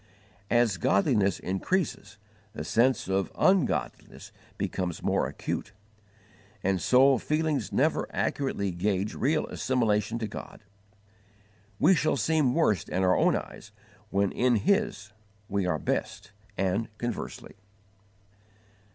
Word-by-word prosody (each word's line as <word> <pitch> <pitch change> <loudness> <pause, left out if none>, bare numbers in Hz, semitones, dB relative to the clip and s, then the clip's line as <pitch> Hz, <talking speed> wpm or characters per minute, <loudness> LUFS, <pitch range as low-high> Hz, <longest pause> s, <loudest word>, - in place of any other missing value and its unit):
As 120 -5 +3
godliness 100 +2 +2
increases 100 - -2 0.4
the - - -5
sense 125 0 +2
of 95 0 0
ungodliness 190 -6 0 0.3
becomes 90 -3 -3
more - - +1
acute, - - -5 0.9
and 95 -2 +1
so 130 0 +5
feelings 155 -4 -1
never - - +1
accurately 115 -8 -1
gauge 100 +3 -1
real 150 +5 0
assimilation 110 -3 0
to 115 -2 -3
God. 105 - -9 1.1
We 190 - +5
shall 155 -2 +1
seem 150 -5 +1
worst 135 - +1
in 95 - 0
our 90 0 +4
own - - +3
eyes - - -7 0.4
when 100 0 +1
in 125 -1 +2
His 110 - 0 0.4
we 100 -3 -1
are - - +1
best, - - -3 0.3
and 95 +4 0
conversely. 120 -2 -6
110 Hz, 115 wpm, -28 LUFS, 95-135 Hz, 1.1 s, so